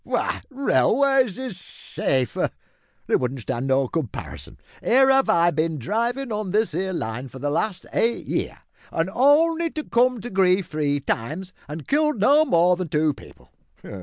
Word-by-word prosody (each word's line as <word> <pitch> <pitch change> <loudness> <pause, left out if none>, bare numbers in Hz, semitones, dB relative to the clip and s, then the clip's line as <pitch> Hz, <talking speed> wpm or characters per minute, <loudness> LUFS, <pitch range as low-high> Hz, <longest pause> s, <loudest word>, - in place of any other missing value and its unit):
W'y, - - -2
railways 270 -3 +2
is 255 -8 -5
safer. 130 - -2 0.6
They - - +1
won't 130 +1 -1
stand 130 +2 -3
no 135 0 +2
comparison. 140 -6 -6 0.3
Here 265 +2 +5
'ave 270 0 +3
I 170 +1 +4
bin 160 +1 -1
drivin' 235 - -2
on 210 -2 -3
this 210 -2 +1
'ere 190 +3 -2
line 125 -5 -4
for 130 - -11
the 145 +2 -2
last 185 +4 -2
eight 235 +1 0
year - - -3 0.3
an' 165 +3 -1
only 325 +5 +3
to 310 -1 -5
come 250 -1 +2
to 245 - -7
grief 190 -1 +3
three 145 -3 -1
times, 155 +10 -3
an' 150 +2 -6
killed 300 - +1
no 290 +9 +5
more 175 - +3
than 185 -1 -3
two 155 0 +1
people. 60 - -17
185 Hz, 165 wpm, -23 LUFS, -, 0.6 s, Here